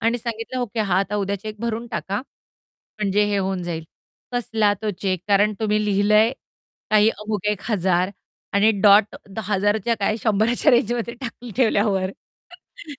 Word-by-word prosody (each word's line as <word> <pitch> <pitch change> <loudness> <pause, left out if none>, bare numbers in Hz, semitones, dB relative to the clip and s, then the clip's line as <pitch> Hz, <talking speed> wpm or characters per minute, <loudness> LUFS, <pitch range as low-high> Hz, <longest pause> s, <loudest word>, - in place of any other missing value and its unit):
आणि 230 +2 +1
सांगितलं, 230 +2 -4
"ओके. 235 -1 -2
हा 190 -3 +2
आता 200 +1 -1
उद्या 200 0 -1
चेक 215 0 -7
भरून 235 0 -3
टाका. 200 -2 -3 0.8
म्हणजे 210 0 +2
हे 205 -1 0
होऊन 190 -1 -2
जाईल." 165 -2 -4 0.5
कसला 220 -3 +1
तो 215 - 0
चेक? 185 -3 0
कारण 205 +1 +4
तुम्ही 210 -1 +1
लिहिलंय 210 +3 +3 0.6
काही 215 0 +5
अमुक 210 -2 -4
₹1,000 190 -3 0 0.4
आणि 210 +2 +5
डॉट, 205 +1 +7
तो 200 +3 -8
हजाराच्या 205 +3 +1
काय 210 +2 +1
शंभराच्या 225 +6 +2
रेंजमध्ये 235 0 +1
टाकून 245 -1 -7
ठेवल्यावर, 205 -6 +2
ते - - -18
210 Hz, 150 wpm, -22 LUFS, 200-225 Hz, 0.8 s, डॉट